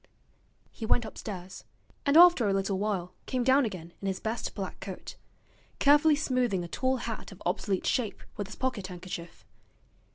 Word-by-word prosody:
He - - -10
went 230 +1 +2
upstairs, 190 -4 -7 0.4
and 280 +2 +5
after 340 - +8
a - - +2
little 195 0 0
while 195 -4 -2
came 255 -2 0
down 265 +2 +5
again 175 -5 -6
in 195 - -3
his 190 -1 -1
best 225 +1 -3
black 195 -3 -5
coat, 190 -2 -7 0.6
carefully 295 +2 +6
smoothing 250 -10 0
a - - -5
tall 260 +9 0
hat 230 -3 -5
of 195 - -12
obsolete 185 +2 0
shape 240 -6 0
with 205 - -4
his 210 - -9
pocket 245 -7 -2
handkerchief. 175 - -8
210 Hz, 165 wpm, -29 LUFS, 185-255 Hz, 0.6 s, after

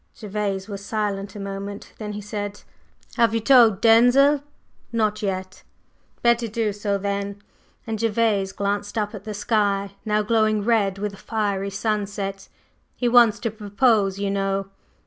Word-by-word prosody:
Gervase 200 -2 -3
was 200 -2 -7
silent 205 -1 -3
a - - -7
moment. 200 +1 -6
Then 210 -1 -5
he 210 - -5
said: 205 0 -5 0.6
"Have 230 -1 +3
you - - +2
told 225 -4 +5
Denzil?" 245 +5 +5 0.5
"Not 215 -2 0
yet." 190 -2 -4 0.6
"Better 235 0 +3
do 220 -1 -1
so 205 0 -1
then," 200 0 -3 0.5
and 225 -1 -3
Gervase 215 -3 +1
glanced 205 +2 -2
up 210 -1 -1
at 200 -2 -9
the 215 -1 -5
sky, 200 -2 0
now 210 -1 +1
glowing 215 -1 +2
red 210 -5 +2
with 205 0 -3
a - - -11
fiery 200 -3 -2
sunset. 200 -2 -3 0.5
"He 245 - -1
wants 235 -3 +6
to 230 - -1
propose, 205 -1 +1
you 200 0 -1
know." 195 0 -1
205 Hz, 150 wpm, -23 LUFS, 200-225 Hz, 0.6 s, wants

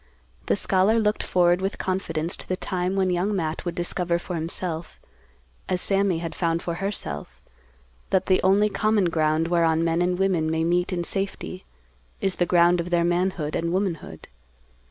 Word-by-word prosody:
The - - +3
scholar 195 +3 +2
looked 215 -1 +1
forward 175 0 +2
with 195 +1 -2
confidence 170 -3 -1
to - - -10
the 185 - -1
time 185 +1 -2
when 190 -1 +1
young 185 +4 0
Matt 160 -3 -3
would 175 -1 -3
discover 175 -1 -1
for 175 +1 -7
himself, 165 0 -3 0.7
as 180 - +1
Sammy 195 -2 +2
had 165 0 -5
found 170 -1 -1
for 170 - -2
herself, 185 - -4 0.7
that 190 -1 +2
the 185 -1 +3
only 195 +3 +4
common 210 -3 +1
ground 155 0 +1
whereon 165 -2 +2
men 165 +1 +1
and 180 0 +1
women 180 -5 +1
may 160 0 0
meet 175 +3 +1
in 175 -2 -1
safety 190 0 -4 0.5
is 190 -1 -1
the 175 - +1
ground 175 0 +4
of 170 - -6
their 175 -1 +2
manhood 175 -3 0
and 170 0 -1
womanhood. 185 -3 -3
175 Hz, 175 wpm, -24 LUFS, 170-190 Hz, 0.7 s, only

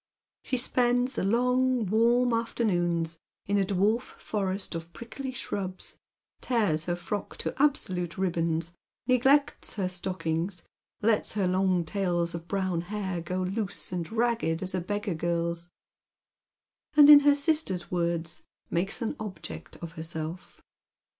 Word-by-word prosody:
She 255 - -1
spends 245 +1 +2
the - - -2
long 250 +3 +2
warm 235 +4 +3
afternoons 175 -8 0 0.3
in 200 0 +1
a - - +3
dwarf 200 +5 +2 0.2
forest 195 -2 -2
of 165 0 -6
prickly 260 +3 -6
shrubs, 190 -7 -4 0.4
tears 205 -11 +1
her 175 - 0
frock 195 +3 -5
to - - -3
absolute 185 - +1
ribbons, 170 -3 0 0.3
neglects 265 +3 +2
her 195 -3 0
stockings, 180 -1 -2 0.4
lets 220 -1 +2
her 205 -3 +1
long 185 -1 +2
tails 175 -2 0
of 170 0 -6
brown 185 -3 0
hair 190 -1 -3
go 185 +2 -2
loose 195 +1 -3
and 175 -1 -3
ragged 225 -8 0
as 185 - -2
a 185 - 0
beggar 205 +2 -2
girl's, 170 +1 -1 1.3
and 295 -1 +9
in 295 -1 +12
her 290 0 +5
sister's 285 - 0
words 170 -2 -1 0.3
makes 195 +8 -1
an 225 - -2
object 210 -3 -7
of 165 - -5
herself. 160 +1 -6
190 Hz, 135 wpm, -28 LUFS, 170-230 Hz, 1.3 s, in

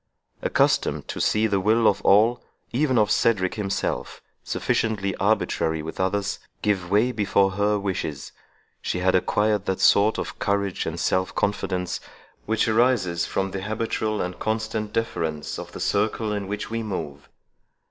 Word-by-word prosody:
Accustomed - - +1
to - - -3
see 110 +1 +2
the 100 -3 +1
will 110 +3 +3
of 100 0 +2
all, 115 +5 +4 0.3
even 130 0 +1
of 105 -1 +3
Cedric 105 -6 +2
himself, 100 - -3 0.2
(sufficiently 100 -4 -1
arbitrary 80 -6 0
with 80 - -7
others,) 100 +2 0 0.2
give 95 -4 0
way 105 +6 +3
before 100 -3 +2
her 105 +2 +1
wishes, 90 -8 -4 0.5
she - - -2
had 95 +1 +2
acquired 105 +2 +1
that 95 - -1
sort 105 +2 +4
of - - -5
courage 100 -2 -1
and - - -4
self 95 0 0
confidence 95 -3 -1 0.5
which 110 +1 +1
arises 110 -7 +2
from 95 0 -1
the 95 - -4
habitual 110 0 -2
and 90 0 -5
constant 110 -1 -2
deference 80 -10 -2
of - - -8
the - - -8
circle 105 +1 0
in 100 -2 -3
which 105 +2 -4
we 115 0 -1
move. 80 -10 -5
100 Hz, 150 wpm, -24 LUFS, 95-110 Hz, 0.5 s, all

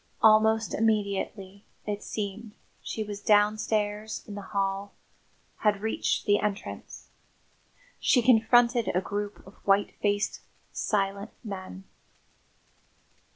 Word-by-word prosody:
Almost 220 0 +5
immediately, 200 -2 -1 0.2
it 210 -1 -3
seemed, 210 +1 -5 0.3
she 220 - -4
was 205 -1 -7
downstairs 210 0 +1
in 210 - -7
the 205 - -6
hall, 195 0 -2 0.6
had 210 -2 +1
reached 220 +1 -1
the 205 -1 +4
entrance. 205 -1 -5 0.9
She 245 - +3
confronted 235 0 +4
a - - +4
group 205 +1 -5
of 190 - -13
white 200 0 +2
faced, 205 0 0 0.3
silent 200 0 -1
men. 190 -3 -7
205 Hz, 105 wpm, -28 LUFS, 200-220 Hz, 0.9 s, Almost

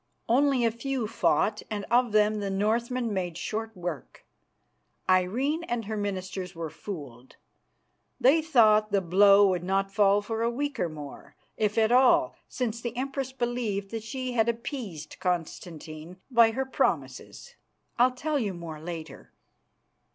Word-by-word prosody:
Only 265 0 +3
a 230 - +3
few 250 +1 -3
fought, 215 -1 +1
and 210 -2 -4
of 240 -1 +3
them 210 0 +3
the 200 -1 -3
Northmen 230 +4 0
made 175 -4 -3
short 220 +3 -4
work. 175 -5 -6 0.8
Irene 235 - +1
and 235 -5 -3
her 220 +1 -4
ministers 190 -2 -4
were 165 -2 -5
fooled. 140 - -9 0.8
They 290 +6 +5
thought 215 -9 +4
the 200 - +3
blow 200 +3 +6
would 180 -2 -1
not 195 +1 0
fall 205 -1 +4
for 225 +2 -3
a 230 - +2
week 285 +4 -3
or 170 - 0
more, 150 -3 -10 0.2
if 210 -1 -1
at 220 0 +3
all, 255 +1 +4
since 235 -2 -3
the 240 0 -5
Empress 270 0 -3
believed 240 -6 -2
that 225 -1 -4
she 255 +3 -4
had 230 -1 +2
appeased 230 - -5
Constantine 165 -1 -4
by 235 -2 +6
her 265 +3 -1
promises. 485 - -2 0.5
I'll 250 +1 +4
tell 295 +3 -1
you 205 -6 -2
more 165 -3 -8
later." 160 -4 -8
215 Hz, 150 wpm, -27 LUFS, 185-240 Hz, 0.8 s, blow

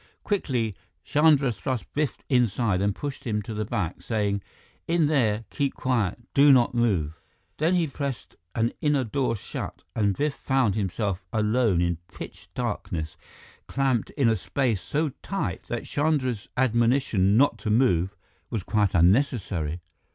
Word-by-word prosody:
Quickly, 125 - 0 0.3
Chandra 150 -3 +4
thrust 130 +1 -4
Biff 150 -1 0
inside 115 -6 +2
and 100 0 +1
pushed 145 -2 -5
him 105 -2 -1
to 115 - -6
the 105 0 -2
back, 90 -4 -3
saying, 100 -3 -1 0.5
"In 170 -1 +3
there 115 -7 +1
keep 140 -2 -1
quiet 115 -8 0 0.2
do 140 +1 +7
not 125 -3 +5
move!" 90 -10 0 0.4
Then 165 +4 +2
he 175 -2 +3
pressed 140 -3 -5 0.2
an 115 0 +1
inner 145 -3 +2
door 125 +1 0
shut, 100 - -6
and 100 -3 +1
Biff 150 0 0
found 130 -8 +1
himself 100 -1 -2
alone 110 -3 +2
in 85 -1 +1
pitch - - -10
darkness, 80 -2 -3 0.5
clamped 135 -5 0
in 135 -5 +3
a 115 - +4
space 115 0 -1
so 150 - -1
tight - - -3
that - - -3
Chandra's 140 -7 0
admonition 120 -5 +3
not 140 +3 +3
to 110 - -3
move 105 -5 +2 0.3
was 110 -6 -3
quite 105 -2 +1
unnecessary. 90 - +2
115 Hz, 145 wpm, -26 LUFS, 100-135 Hz, 0.5 s, do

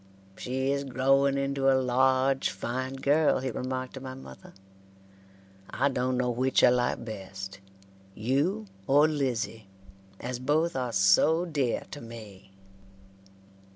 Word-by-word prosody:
"She 130 +2 -2
is 140 0 -1
growing 135 +1 +2
into 140 0 +1
a 130 - +4
large 130 +1 +2
fine 130 +2 -4
girl," 145 +3 +3
he 130 0 -3
remarked 130 +2 -4
to 135 - -7
my 130 0 -7
mother. 65 - -13 1.1
"I 140 +4 +1
dun 125 -1 -1
no 125 -1 +1
which 130 +2 +1
I - - +8
like 125 -1 0
best, 95 -2 -7 0.6
you 145 - 0 0.2
or 145 +3 +5
Lizzie, 125 -8 -2 0.5
as 125 0 -4
both 155 +5 +1
are 125 -2 -2
so 110 - +4
dear 145 -8 -1
to 145 - -7
me." 110 -5 -11
130 Hz, 130 wpm, -28 LUFS, 120-140 Hz, 1.1 s, I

